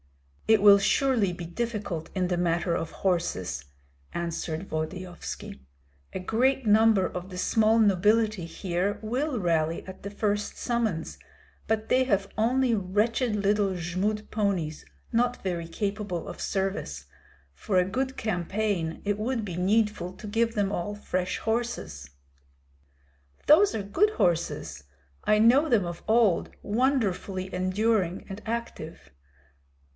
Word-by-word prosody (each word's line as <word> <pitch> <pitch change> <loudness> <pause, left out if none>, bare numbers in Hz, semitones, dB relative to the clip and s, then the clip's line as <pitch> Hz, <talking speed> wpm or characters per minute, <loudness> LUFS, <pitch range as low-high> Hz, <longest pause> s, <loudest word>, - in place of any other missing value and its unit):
"It 220 -2 +5
will 200 -1 +9
surely 235 -2 +2
be 175 -1 -7
difficult 200 -3 -4
in 185 -2 0
the 180 - 0
matter 170 0 +1
of 165 - -3
horses," 95 - -1 0.5
answered 170 +1 -3
Volodyovski. 175 - -5 0.5
"A - - -4
great 250 +7 +1
number 215 -2 +5
of 180 +1 -5
the 180 - -8
small 220 +4 +3
nobility 210 -1 +3
here 180 +3 -2
will 250 +4 -1
rally 165 -3 0
at 190 0 -10
the 200 - -5
first 205 0 -2
summons, 225 -9 -2 0.5
but 220 0 0
they 255 +1 +4
have 200 -5 +1
only 245 +3 +2
wretched 210 +4 0
little 200 -1 +1
Jmud 185 +5 -2
ponies, 190 -8 -1 0.3
not 245 +1 +1
very 175 -3 -2
capable 200 -1 -3
of - - -7
service. 190 - -2 0.5
For 185 - -1
a 180 - +4
good 260 +7 -2
campaign 190 -3 -1
it 205 0 0
would 230 0 -1
be 180 -4 -5
needful 195 0 +1
to 210 - -10
give 230 +2 0
them 200 -2 +1
all 205 +2 -3
fresh 185 -3 -2
horses." 220 - -3 1.4
"Those 375 +7 +6
are 210 - -2
good 290 - +2
horses; 170 - -1 0.4
I 210 - +3
know 260 +8 +5
them 215 -8 +3
of 175 0 -6
old, 220 -6 +3
wonderfully 205 -6 0
enduring 185 0 0
and 200 +2 -7
active." 220 - -5
200 Hz, 130 wpm, -27 LUFS, 180-225 Hz, 1.4 s, will